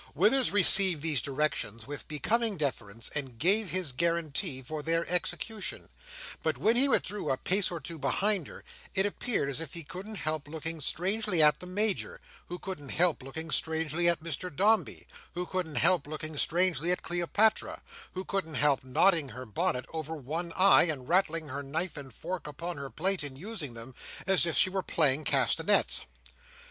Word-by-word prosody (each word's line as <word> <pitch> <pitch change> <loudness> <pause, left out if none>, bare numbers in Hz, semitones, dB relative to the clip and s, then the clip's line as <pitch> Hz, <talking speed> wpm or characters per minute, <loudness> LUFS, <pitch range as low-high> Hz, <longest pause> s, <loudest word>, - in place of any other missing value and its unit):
Withers 265 -2 +4
received 190 -5 +7
these 150 -7 +3
directions 130 -5 -3
with 145 0 -7
becoming 215 - -1
deference, 115 -7 -3
and 135 -5 -5
gave 195 - +2
his 185 -6 0
guarantee 165 -1 -1
for 155 +4 -6
their 165 +2 -1
execution; 190 +4 -1 0.5
but - - -2
when 225 +2 +2
he 270 +3 +5
withdrew 205 - 0
a 130 - 0
pace 195 +6 +2
or 170 - -5
two 160 +2 -7
behind 185 +6 0
her, - - -12 0.3
it 190 - +4
appeared 205 - -1
as 140 +3 -2
if 165 -2 -4
he 170 - -6
couldn't 195 +8 -9
help 155 -5 -3
looking 160 +1 -6
strangely 190 +5 +1
at 150 0 +4
the 180 - -9
Major, 205 +2 0 0.3
who 175 - -6
couldn't 175 -8 -8
help 170 -1 +2
looking 155 +5 -7
strangely 160 +2 +1
at 170 -2 0
Mr 165 +2 -4
Dombey, 210 +7 0 0.3
who 180 +1 -3
couldn't 180 -5 -4
help 180 -5 +2
looking 155 0 -5
strangely 170 0 +1
at 180 - -1
Cleopatra, 175 +5 0 0.3
who 185 +1 -6
couldn't 175 -6 -3
help 145 -3 +2
nodding 145 +3 +2
her 130 +1 -9
bonnet 125 +3 -2
over 160 0 -5
one 160 +5 -5
eye, 190 -2 +5
and 140 -7 -3
rattling 165 -4 0
her 140 +2 -5
knife 155 +6 -3
and 140 -3 -9
fork 180 0 -6
upon 170 +4 -6
her 140 -1 -7
plate 185 - 0
in 140 -2 -6
using 160 - -4
them, 115 +3 -8 0.3
as 185 -5 +4
if 160 -5 -1
she 185 - +6
were 190 0 -2
playing 155 -4 +1
castanets. - - +3
165 Hz, 175 wpm, -28 LUFS, 145-185 Hz, 0.5 s, received